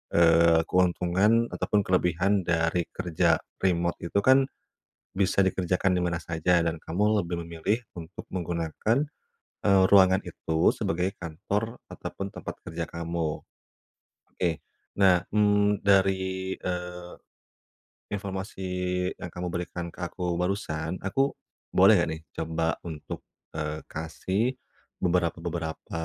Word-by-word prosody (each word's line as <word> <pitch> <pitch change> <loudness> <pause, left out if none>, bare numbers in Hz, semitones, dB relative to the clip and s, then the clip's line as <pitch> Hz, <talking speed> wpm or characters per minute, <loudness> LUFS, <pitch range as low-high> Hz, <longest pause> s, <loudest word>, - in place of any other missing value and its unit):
eee, 85 -1 +6
keuntungan 95 +5 +3
ataupun 105 -1 +1
kelebihan 90 +2 +2
dari 85 0 +1
kerja 90 -4 +2 0.2
remote 85 -2 +1
itu 95 - -2
kan, 130 +2 +5 0.7
bisa 100 0 +3
dikerjakan 90 0 +1
di - - +1
mana 85 -1 -1
saja, 85 +2 +2
dan 85 0 -1
kamu 105 +5 +1
lebih 85 0 -3
memilih 85 +7 -1 0.2
untuk 85 +2 -9
menggunakan, 85 - -1 0.7
eee, 100 -2 +6
ruangan 95 -1 +6
itu 80 -2 +1
sebagai 90 +3 -1
kantor 100 +7 -3
ataupun 100 0 -6
tempat - - -7
kerja 80 0 -4
kamu. 85 -2 -3 0.9
Oke. 85 -4 -1 0.4
Nah, 90 -3 +5
mmm, 105 -1 +3
dari, 95 -1 +2
eee, 90 -1 -4 1.0
informasi 95 -1 -4 0.5
yang 90 - -6
kamu 90 0 -3
berikan 85 0 -4
ke - - -21
aku 90 -2 -2
barusan, 90 -3 -2
aku 135 +9 +1 0.4
boleh 100 +3 +7
enggak 85 - +1
nih 80 - -9 0.2
coba 80 0 -1 0.2
untuk, 80 -3 -7 0.3
eee, 75 0 -3
kasih 80 +6 -2 0.6
beberapa-beberapa, 85 -2 -1
90 Hz, 115 wpm, -27 LUFS, 85-95 Hz, 1.0 s, boleh